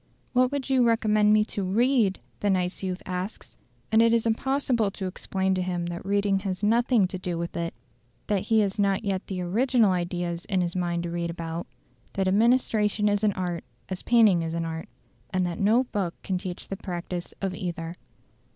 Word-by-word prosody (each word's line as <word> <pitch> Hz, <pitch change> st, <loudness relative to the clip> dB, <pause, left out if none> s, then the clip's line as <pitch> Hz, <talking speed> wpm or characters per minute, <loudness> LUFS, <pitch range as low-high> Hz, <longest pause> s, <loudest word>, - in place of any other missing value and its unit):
"What 250 Hz, +1 st, +3 dB
would 285 Hz, -2 st, -2 dB
you 260 Hz, -2 st, +3 dB
recommend 215 Hz, -2 st, +3 dB
me 215 Hz, 0 st, +5 dB
to 205 Hz, -, -4 dB
READ?" 220 Hz, +1 st, +2 dB, 0.2 s
the 205 Hz, -, 0 dB
nice 180 Hz, -1 st, 0 dB
youth 185 Hz, -1 st, -3 dB
asks; 185 Hz, +3 st, -5 dB, 0.4 s
and 220 Hz, 0 st, +6 dB
it 230 Hz, 0 st, +5 dB
is 230 Hz, -, +1 dB
impossible 240 Hz, -1 st, +1 dB
to 195 Hz, 0 st, -6 dB
explain 190 Hz, +1 st, -1 dB
to 185 Hz, -, 0 dB
him 180 Hz, -1 st, -2 dB
that 175 Hz, 0 st, -5 dB
reading 200 Hz, 0 st, +1 dB
has 195 Hz, 0 st, -4 dB
nothing 230 Hz, 0 st, +4 dB
to 185 Hz, 0 st, -4 dB
do 180 Hz, -2 st, -3 dB
with 170 Hz, 0 st, -4 dB
it, 170 Hz, 0 st, -3 dB, 0.5 s
that 205 Hz, -3 st, +1 dB
he 220 Hz, +2 st, +3 dB
has 200 Hz, 0 st, -1 dB
not 200 Hz, +1 st, +1 dB
yet 195 Hz, -1 st, -2 dB
the 185 Hz, -2 st, -3 dB
original 225 Hz, +4 st, +3 dB
ideas 175 Hz, -1 st, -2 dB
in 190 Hz, -3 st, 0 dB
his 175 Hz, 0 st, -2 dB
mind 175 Hz, -1 st, -1 dB
to 170 Hz, -, -4 dB
read 170 Hz, 0 st, -2 dB
about; 165 Hz, 0 st, -5 dB, 0.5 s
that 195 Hz, -1 st, 0 dB
administration 210 Hz, 0 st, +3 dB
is 205 Hz, 0 st, +1 dB
an 210 Hz, -2 st, +3 dB
art 175 Hz, -3 st, -3 dB, 0.3 s
as 185 Hz, -1 st, -4 dB
painting 220 Hz, -7 st, +5 dB
is 165 Hz, 0 st, -3 dB
an 165 Hz, 0 st, -1 dB
art; 160 Hz, 0 st, -5 dB, 0.4 s
and 185 Hz, -1 st, 0 dB
that 175 Hz, -1 st, -3 dB
no 220 Hz, +5 st, +4 dB
book 195 Hz, -8 st, -3 dB
can 185 Hz, -2 st, -1 dB
teach 180 Hz, -1 st, -6 dB
the 195 Hz, -, -4 dB
practice 175 Hz, -2 st, -5 dB
of 195 Hz, -2 st, -2 dB
either. 170 Hz, -2 st, -4 dB
195 Hz, 195 wpm, -26 LUFS, 175-215 Hz, 0.5 s, and